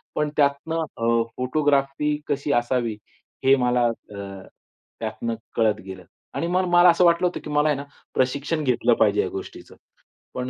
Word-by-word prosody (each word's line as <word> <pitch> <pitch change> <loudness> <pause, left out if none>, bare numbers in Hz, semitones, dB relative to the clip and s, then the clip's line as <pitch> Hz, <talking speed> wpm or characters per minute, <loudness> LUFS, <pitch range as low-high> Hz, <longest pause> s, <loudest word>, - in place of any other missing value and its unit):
पण 150 0 0
त्यातनं 145 +3 +1 0.2
अ, 115 0 +2
फोटोग्राफी 140 +2 +1 0.2
कशी 145 0 -1
असावी 120 -2 0 0.5
हे 135 +1 +7
मला 125 0 +2
अ, 100 -4 -7 0.5
त्यातनं 115 +1 -3 0.2
कळत 110 -2 +2
गेलं. 95 -1 -9 0.3
आणि 165 - -2
म 180 +1 0
मला 175 0 +7
असं 175 +1 +4
वाटलं 170 +1 +4
होतं, 175 - -4
की 150 - -7
मला 150 +1 +2
आहे 150 - +2
ना 140 - -5 0.3
प्रशिक्षण 140 +4 0
घेतलं 120 -2 +2
पाहिजे 105 -1 +4
या 95 - -2
गोष्टीचं. 95 - -9 0.6
पण 125 0 -4
130 Hz, 160 wpm, -23 LUFS, 115-150 Hz, 0.6 s, हे